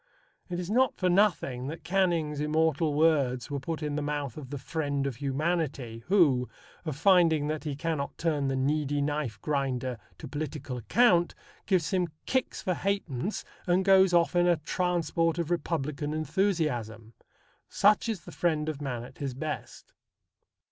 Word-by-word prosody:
It 175 -1 -3
is 180 +2 -4
not 255 +2 +3
for 185 - +1
nothing 175 -10 +2
that 160 +3 -6
Canning's 170 -6 +1
immortal 155 0 +1
words 145 -5 +2
were 140 - -1
put 160 +3 -4
in 150 -1 -2
the 150 - -1
mouth 145 -4 -3
of 145 -4 -8
the 145 - -4
Friend 145 -1 -2
of 135 -4 -3
Humanity, 140 -5 -2
who, 145 - +4 0.4
finding 160 -1 +4
that 155 0 -3
he 145 -2 -2
cannot 150 -1 -3
turn 150 -4 0
the 135 - 0
Needy 145 +2 0
Knife 145 -7 -2
Grinder 130 -4 -1 0.2
to 155 - -8
political 145 -2 -5
account, 175 - +3 0.3
give 185 -5 +2
him 180 -2 +1 0.2
kicks 260 -1 -1
for 185 - +1
ha'pence, 195 - -2 0.2
and 180 +1 +2
goes 190 -1 +6
off 170 0 +3
in 175 0 +4
"a 175 -1 +4
transport 165 0 0
of 170 -1 -2
Republican 150 -3 -2
enthusiasm." 150 - -1 0.6
Such 210 +3 +3
is 210 -6 -2
the - - -11
Friend 155 -3 0
of 150 -2 -5
Man 125 -4 -3
at 130 +1 -13
his 135 -3 -3
best. 150 +2 -6
155 Hz, 160 wpm, -28 LUFS, 140-175 Hz, 0.6 s, goes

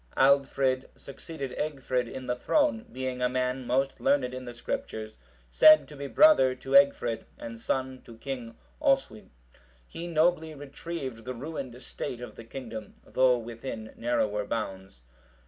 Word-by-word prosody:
Aldfrid(733) 135 -1 +3
succeeded 140 -1 -7
Egfrid 130 -5 -1
in 130 -1 -6
the 125 - -1
throne, 245 - +1
being 130 -1 -4
a 125 - +3
man 125 0 -1
most 135 +2 +1
learned 275 - +2
in 130 0 -6
the 120 - -7
Scriptures, 110 -2 -5 0.3
said 310 0 +8
to 150 - -11
be 140 0 -5
brother 135 - +6
to 135 +1 -9
Egfrid, 140 -5 +4
and 115 0 -8
son 130 +2 -2
to 115 -2 -12
King 125 -3 -6 0.2
Oswy; 270 - +1 0.6
he 170 +1 -7
nobly 160 -1 +2
retrieved 140 -3 -6
the 125 +2 -5
ruined 130 -2 -6
state 120 - -5
of 125 - -8
the - - -10
kingdom, 115 -2 -8
though 130 -1 +3
within 115 -1 -7
narrower 105 -3 0
bounds. 95 - -5
130 Hz, 145 wpm, -28 LUFS, 120-140 Hz, 0.6 s, said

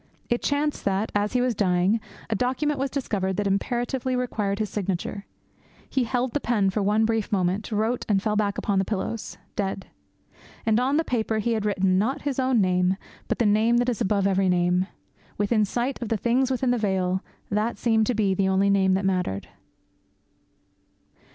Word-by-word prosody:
It 240 - +1
chanced 290 +1 0
that, 200 +2 0
as 205 0 0
he 250 - +2
was 250 -1 +1
dying, 190 +1 +2 0.3
a - - -1
document 260 +6 0
was 270 +1 0
discovered 195 -9 -2
that 205 - 0
imperatively 240 +6 -1
required 215 -5 -1
his 215 0 -1
signature. 200 0 -3 0.6
He 260 -2 0
held 245 +1 -1
the 290 - +1
pen 210 -7 +1
for 210 - -1
one 210 +3 +2
brief 225 -2 -1
moment, 190 +2 0
wrote, 220 +3 0
and 200 -2 +4
fell 210 +1 -1
back 205 -1 0
upon 200 -2 0
the - - +2
pillows, 210 +2 -4 0.2
dead. 195 -1 -2 0.8
And 225 0 +3
on 265 +4 +2
the 325 - +2
paper 225 -5 -1
he 230 +2 0
had 215 -2 -1
written, 190 -2 +2
not 265 +8 -1
his 280 -2 -2
own 260 -2 +2
name, 185 -1 +2 0.3
but - - -1
the 235 - +2
Name 220 +3 +3
that 245 +1 +2
is 235 - -2
above 200 0 +1
every 195 -1 +2
name. 180 +1 +2 0.5
Within 210 +1 +2
sight 245 +6 -2
of 235 - -3
the 225 - +1
things 250 +5 +1
within 260 -1 +1
the 245 - +1
veil, 190 -2 0 0.3
that 215 +3 0
seemed 220 -2 +2
to 250 - +1
be 205 -3 +2
the 190 0 +1
only 195 +1 +3
name 190 -1 +3
that 190 +1 -1
mattered. 180 - -1
210 Hz, 190 wpm, -25 LUFS, 195-240 Hz, 0.8 s, and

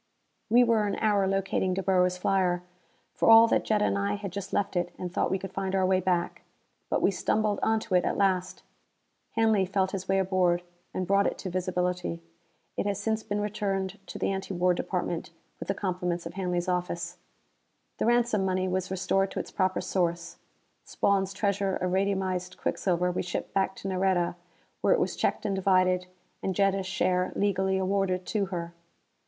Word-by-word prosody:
We 240 +3 +6
were 225 -3 +2
an 200 - -1
hour 205 -3 +2
locating 190 -1 0
De 195 - -2
Boer's 180 -1 +2
flyer, 180 -1 +1 0.5
for - - +2
all 225 0 +10
that - - +2
Jetta 210 -1 +2
and 200 - +1
I 200 +1 0
had 200 -2 -6
just 195 +1 -6
left 200 -1 -1
it 175 0 0
and 180 -1 -5
thought - - +1
we 190 - +1
could 195 0 -8
find 195 0 -2
our 190 -1 +3
way 185 0 +3
back. 180 -2 -1 0.5
But - - 0
we - - +4
stumbled 210 +2 0
onto 220 -3 0
it 180 - +4
at - - -1
last. 185 -2 0 0.7
Hanley 220 -3 +3
felt 190 0 0
his 190 -1 -5
way 195 - +3
aboard 185 -2 +2 0.3
and 185 - -2
brought 200 +2 +3
it - - -2
to 185 - -5
visibility. 180 - -1 0.6
It - - -1
has 200 -1 -1
since 220 +1 -1
been 205 -1 -2
returned 200 -2 -2
to - - -7
the - - 0
Anti 195 0 -4
War 180 +1 +3
Department, 175 -2 -3 0.3
with - - -6
the 195 - 0
compliments 180 -3 -2
of 170 - -6
Hanley's 180 -2 -2
Office. 180 -1 -2 0.8
The - - +1
ransom 235 -4 +3
money 185 0 0
was 185 0 -1
restored 190 +1 +1
to - - -4
its - - -6
proper 185 -1 0
source. 175 -2 -1 0.5
Spawn's 195 -1 +1
treasure 200 -1 0
of 180 0 -1
radiumized 190 -1 -1
quicksilver 180 -1 0
we 180 - -2
shipped 180 - -4
back 190 0 +1
to - - -7
Nareda, 185 -2 +1 0.5
where - - +4
it - - 0
was - - 0
checked - - -1
and 200 -2 0
divided, 185 -1 +2 0.3
and 190 - -2
Jetta's 195 -1 +1
share 185 -1 +1
legally 190 -1 +1
awarded 190 -1 0
to 205 -3 0
her. 170 -2 -5
190 Hz, 185 wpm, -28 LUFS, 180-200 Hz, 0.8 s, all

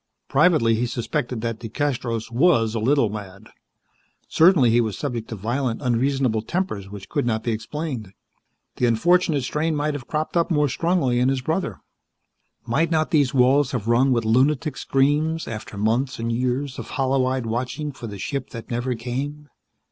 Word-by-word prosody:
Privately, 150 -6 +4
he 120 +2 0
suspected 120 0 -3
that 115 -1 -3
DeCastros 120 -1 -3
was 120 -4 +3
a 115 - -1
little 125 0 +2
mad. 100 0 -9 0.8
Certainly 160 -8 +5
he 120 +1 +4
was 110 -4 -2
subject 120 -6 -4
to 115 - -4
violent, 120 +4 -2
unreasonable 125 -1 +1
tempers 110 - -3
which 100 -2 -9
could - - -1
not 110 -2 -1
be 115 - -1
explained. 115 - -4 0.7
The 125 - +2
unfortunate 160 +4 +2
strain 155 +5 -1
might 150 +1 0
have 135 -4 -7
cropped 155 +2 -2
up 170 +1 +2
more 150 -4 +2
strongly 160 -4 +1
in 125 +1 +3
his 135 -1 0
brother. 160 +8 -2 0.8
Might 155 +8 +1
not 155 -1 +1
these 145 -4 +2
walls 130 +2 +4
have 115 -4 -3
rung 125 +3 +3
with 115 -3 +1
lunatic 130 +5 +2
screams 150 +5 +1
after 110 -2 -7
months 120 +6 0
and 115 0 -2
years 125 +3 -1
of - - -6
hollow 135 -1 +2
eyed 130 -2 -1
watching 125 +6 -3
for 130 -3 -8
the 100 -2 -7
ship 140 +8 -4
that 115 0 -9
never 120 +1 -1
came? 140 +6 -5
125 Hz, 170 wpm, -23 LUFS, 115-145 Hz, 0.8 s, Certainly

